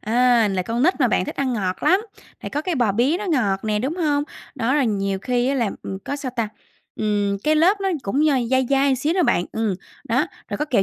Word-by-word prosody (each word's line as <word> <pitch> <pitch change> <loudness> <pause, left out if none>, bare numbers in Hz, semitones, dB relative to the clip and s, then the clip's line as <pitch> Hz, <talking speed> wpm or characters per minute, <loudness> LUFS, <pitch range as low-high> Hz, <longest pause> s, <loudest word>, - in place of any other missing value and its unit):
à, 235 -1 +3
là 190 -2 -1
con 230 +5 -2
nít 345 +2 +2
mà 250 - +4
bạn, 185 - +1
thích - - -6
ăn 265 -2 0
ngọt 190 -5 -2
lắm, 375 +2 +4 0.4
thì - - -5
có 295 - -2
cái 360 -1 -1
bò 240 -7 +2
bía 255 - +2
nó 420 - -5
ngọt 220 - 0
nè, 210 -1 0
đúng 265 +8 -2
hông? 295 -4 +1 0.3
Đó 255 +1 0
là 290 -3 +3
nhiều 195 -3 -1
khi 245 +3 0
á 275 - +1
là, 235 -6 0
ừm, 190 - -5
có 285 - -3
sao 270 -3 -4
ta? 225 -2 0 0.5
Ừm, 205 -2 0
cái 310 +1 +3
lớp 380 +6 +4
nó 390 - 0
cũng 275 +10 +1
d 260 -6 +1
dai 260 -1 +2
dai 275 0 +3
một - - +3
xíu 310 +6 0
đó 365 - +3
bạn. 175 - +2
Ừm, 220 -4 0 0.3
đó, 255 +3 +1 0.2
rồi - - -4
có 300 - 0
kẹo 245 -10 +2
250 Hz, 260 wpm, -22 LUFS, 210-290 Hz, 0.5 s, mà